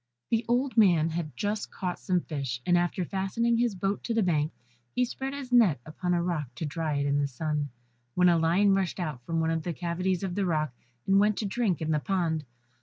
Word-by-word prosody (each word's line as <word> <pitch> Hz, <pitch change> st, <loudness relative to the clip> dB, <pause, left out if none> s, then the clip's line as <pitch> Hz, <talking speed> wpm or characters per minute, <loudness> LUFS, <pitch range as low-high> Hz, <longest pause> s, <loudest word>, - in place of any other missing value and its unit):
] 120 Hz, -, -59 dB
The 230 Hz, 0 st, +2 dB
old 250 Hz, +2 st, +1 dB
man 170 Hz, -7 st, +5 dB
had 160 Hz, -2 st, -4 dB
just 210 Hz, +1 st, -2 dB
caught 180 Hz, -2 st, -4 dB
some 180 Hz, -1 st, +1 dB
fish, 140 Hz, -7 st, -4 dB
and 175 Hz, -, +4 dB
after 175 Hz, +1 st, +1 dB
fastening 200 Hz, +6 st, 0 dB
his 235 Hz, -3 st, +1 dB
boat 195 Hz, +2 st, -1 dB
to 230 Hz, -, -1 dB
the 225 Hz, -, +3 dB
bank, 155 Hz, -3 st, +1 dB, 0.4 s
he 250 Hz, -, +3 dB
spread 270 Hz, +3 st, -5 dB
his 270 Hz, -3 st, -7 dB
net 220 Hz, -, +5 dB
upon 180 Hz, +3 st, -1 dB
a 170 Hz, -, +1 dB
rock 170 Hz, -5 st, -1 dB
to 160 Hz, -, -3 dB
dry 155 Hz, 0 st, -2 dB
it 140 Hz, 0 st, 0 dB
in 145 Hz, 0 st, +2 dB
the 145 Hz, -, +1 dB
sun, 150 Hz, +2 st, -2 dB, 0.5 s
when 180 Hz, 0 st, +5 dB
a 170 Hz, -1 st, +5 dB
lion 180 Hz, +5 st, +4 dB
rushed 195 Hz, -1 st, 0 dB
out 155 Hz, -8 st, -3 dB
from 165 Hz, -1 st, 0 dB
one 160 Hz, 0 st, +1 dB
of 165 Hz, 0 st, 0 dB
the 170 Hz, +2 st, -3 dB
cavities 180 Hz, +2 st, -1 dB
of 190 Hz, -2 st, -2 dB
the 195 Hz, 0 st, 0 dB
rock, 155 Hz, -5 st, 0 dB, 0.3 s
and 195 Hz, 0 st, +4 dB
went 210 Hz, 0 st, +3 dB
to 215 Hz, -, -1 dB
drink 200 Hz, -, 0 dB
in 160 Hz, -, -1 dB
the 150 Hz, -, +2 dB
pond. 165 Hz, -3 st, -1 dB
175 Hz, 235 wpm, -28 LUFS, 155-200 Hz, 0.5 s, man